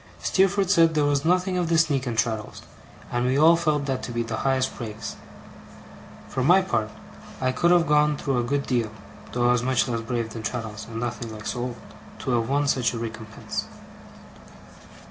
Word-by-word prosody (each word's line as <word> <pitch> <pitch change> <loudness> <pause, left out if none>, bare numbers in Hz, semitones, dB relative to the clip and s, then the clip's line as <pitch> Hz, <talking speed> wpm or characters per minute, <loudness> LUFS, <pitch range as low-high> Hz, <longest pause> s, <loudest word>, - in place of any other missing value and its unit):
Steerforth 195 0 +2
said 165 -4 +4
there 150 -1 +3
was 145 -1 +1
nothing 180 +2 +2
of 175 -2 -1
the 165 - +3
sneak 145 -5 +2
in 120 - -2
Traddles, 110 -1 -2 0.5
and 120 0 0
we 130 +2 +2
all 160 +3 +7
felt 150 -4 0
that 135 -2 -2
to - - -6
be 120 0 -1
the 115 -1 -4
highest 130 -1 0
praise. 110 -2 -6 1.1
For 130 - -2
my 180 +7 +5
part, 110 -10 -1 0.5
I 130 0 +1
could 170 +7 +2
have 175 -1 +5
gone 150 0 +3
through 135 -4 -1
a - - 0
good 140 +3 -1
deal 120 -4 0 0.4
(though 120 0 +1
I - - +5
was 125 -1 +2
much 130 +1 +1
less 115 -2 -2
brave 115 -1 -3
than 115 - -6
Traddles, 110 -1 -5
and 115 0 -5
nothing 120 -1 -4
like 110 0 -9
so 125 - -3
old) 120 0 -4 0.4
to - - -3
have 115 -1 +1
won 145 +1 +1
such 125 -3 +1
a - - -3
recompense. 110 -1 -5
130 Hz, 200 wpm, -25 LUFS, 115-150 Hz, 1.1 s, all